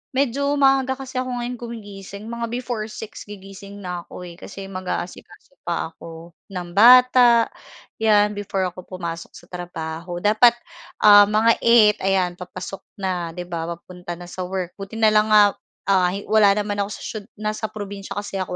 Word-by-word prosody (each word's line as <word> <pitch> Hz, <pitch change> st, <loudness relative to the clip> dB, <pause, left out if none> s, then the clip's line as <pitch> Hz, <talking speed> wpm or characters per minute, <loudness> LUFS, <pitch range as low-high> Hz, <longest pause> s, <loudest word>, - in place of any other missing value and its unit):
medyo 280 Hz, +2 st, +1 dB
maaga 270 Hz, -1 st, +3 dB
kasi 260 Hz, -1 st, -5 dB
ako 255 Hz, -1 st, -3 dB
ngayon 245 Hz, 0 st, -4 dB
gumigising, 205 Hz, -4 st, -9 dB
mga 235 Hz, 0 st, -3 dB
before 240 Hz, -3 st, -4 dB
6:00 220 Hz, 0 st, -9 dB
gigising 200 Hz, 0 st, -11 dB
na 180 Hz, -1 st, -4 dB
ako 180 Hz, -, -9 dB
eh, 175 Hz, 0 st, -11 dB
kasi 200 Hz, -1 st, -9 dB
mag-aasikaso 185 Hz, +3 st, -7 dB
pa 170 Hz, -1 st, -2 dB
ako 165 Hz, +1 st, -12 dB, 0.2 s
ng 180 Hz, -2 st, -6 dB
bata, 245 Hz, +2 st, +6 dB, 0.5 s
'yan, 210 Hz, -1 st, +4 dB
before 200 Hz, -2 st, -3 dB
ako 180 Hz, 0 st, -12 dB
pumasok 170 Hz, -3 st, -6 dB
sa -, -, -13 dB
trabaho. 175 Hz, -1 st, -6 dB
Dapat, 225 Hz, +3 st, +5 dB, 0.5 s
um, 205 Hz, -1 st, +9 dB
mga 215 Hz, +2 st, +3 dB
8:00 230 Hz, -3 st, +5 dB
ayan, 190 Hz, -2 st, +1 dB
papasok 185 Hz, +1 st, -7 dB, 0.2 s
na, 180 Hz, -4 st, -3 dB
'di 180 Hz, -, -5 dB
ba? 170 Hz, -2 st, -4 dB
Papunta 175 Hz, 0 st, -9 dB
na 175 Hz, +1 st, -10 dB
sa 180 Hz, +1 st, -6 dB
work. 185 Hz, -2 st, -4 dB
Buti 195 Hz, +3 st, -8 dB
na 220 Hz, -1 st, +4 dB
lang 215 Hz, 0 st, +3 dB
nga, 210 Hz, -1 st, +6 dB, 0.4 s
ah, 185 Hz, -2 st, +4 dB
hi 200 Hz, +2 st, -5 dB
wala 210 Hz, -2 st, +4 dB
naman 205 Hz, -1 st, -2 dB
ako 200 Hz, -, -1 dB
sa -, -, -12 dB
siyu 215 Hz, -, -5 dB, 0.2 s
nasa 215 Hz, +1 st, -3 dB
probinsiya 200 Hz, -2 st, -7 dB
kasi 205 Hz, -1 st, -4 dB
ako 185 Hz, -1 st, -3 dB
200 Hz, 170 wpm, -22 LUFS, 180-225 Hz, 0.5 s, um